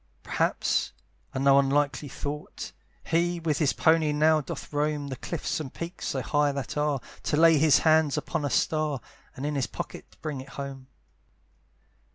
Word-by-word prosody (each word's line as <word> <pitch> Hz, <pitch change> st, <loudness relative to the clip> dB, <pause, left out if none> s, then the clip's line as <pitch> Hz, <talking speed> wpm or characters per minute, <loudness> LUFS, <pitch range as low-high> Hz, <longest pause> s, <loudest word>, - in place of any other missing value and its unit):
Perhaps, -, -, 0 dB, 0.4 s
and 130 Hz, -, -2 dB
no 140 Hz, 0 st, +7 dB
unlikely 140 Hz, +1 st, +1 dB
thought! 145 Hz, +3 st, -6 dB, 0.3 s
He 175 Hz, +1 st, +1 dB
with 160 Hz, -3 st, 0 dB
his 150 Hz, -4 st, +3 dB
pony 160 Hz, -1 st, +3 dB
now 155 Hz, +1 st, +4 dB
doth 145 Hz, -, -7 dB
roam 145 Hz, -1 st, 0 dB
The 130 Hz, -, -3 dB
cliffs 165 Hz, +6 st, -3 dB
and 140 Hz, -4 st, -5 dB
peaks 170 Hz, +2 st, -6 dB
so 130 Hz, -2 st, -2 dB
high 145 Hz, 0 st, +2 dB
that 140 Hz, -3 st, -4 dB
are, 150 Hz, -2 st, +1 dB, 0.2 s
To 150 Hz, -, 0 dB
lay 165 Hz, -1 st, +6 dB
his 155 Hz, -1 st, +6 dB
hands 155 Hz, -2 st, +4 dB
upon -, -, -2 dB
a 145 Hz, -, 0 dB
star, 155 Hz, 0 st, +1 dB, 0.4 s
And 135 Hz, -, -5 dB
in 150 Hz, -, -1 dB
his 135 Hz, -3 st, 0 dB
pocket -, -, -8 dB
bring 150 Hz, -4 st, -4 dB
it 135 Hz, -, -12 dB
home. 135 Hz, -2 st, -6 dB
150 Hz, 170 wpm, -27 LUFS, 140-155 Hz, 0.4 s, no